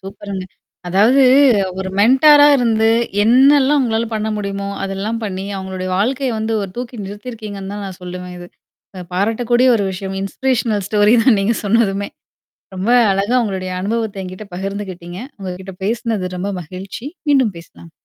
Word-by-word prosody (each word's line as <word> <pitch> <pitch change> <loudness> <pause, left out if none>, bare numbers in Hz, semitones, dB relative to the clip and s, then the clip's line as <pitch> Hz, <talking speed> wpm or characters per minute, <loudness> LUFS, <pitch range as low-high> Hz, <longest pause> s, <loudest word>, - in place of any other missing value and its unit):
சூப்பர்ங்க. 195 -1 -7 0.4
அதாவது 220 +9 +4 0.6
ஒரு 190 - -3
மென்ட்டாரா 290 +6 +6
இருந்து, 225 -3 +2 0.4
என்னல்லாம் 275 +4 +5
உங்களால 230 -2 0
பண்ண 215 0 -2
முடியுமோ, 200 -1 -4
அதெல்லாம் 195 +4 -3
பண்ணி, 190 -2 -4
அவங்களுடைய 190 -1 -5
வாழ்க்கைய 255 +6 0
வந்து 220 +1 -2
ஒரு 195 - -5
தூக்கி 245 0 -6
நிறுத்தியிருக்கீங்கன்னு 205 -1 -7
தான் 205 -1 -5
நான் 190 -1 -9
சொல்லுவேன் 180 0 -7
இது. 175 - -9 0.5
அ 185 - -6
பாராட்டக்கூடிய 235 +5 +1
ஒரு 205 - -1
விஷயம். 190 +1 -5
இன்ஸ்பிரேஷனல் 220 -1 -1
ஸ்டோரி 210 +1 +4
தான் 245 -4 +5
நீங்கச் 220 +3 0
சொன்னதுமே. 200 -2 +1 0.7
ரொம்ப 190 +5 -2 0.2
அழகா 200 +5 0
உங்களுடைய 190 -3 -3
அனுபவத்தை 215 0 -2
என்கிட்ட 185 +3 -8
பகிர்ந்துகிட்டீங்க. 185 -2 -6 0.2
உங்ககிட்ட 190 0 -7
பேசினது 215 -4 -2
ரொம்ப 195 +3 -3
மகிழ்ச்சி. 190 - -8 0.2
மீண்டும் 260 -9 +3
பேசலாம். 165 0 -15
205 Hz, 140 wpm, -18 LUFS, 190-230 Hz, 0.7 s, மென்ட்டாரா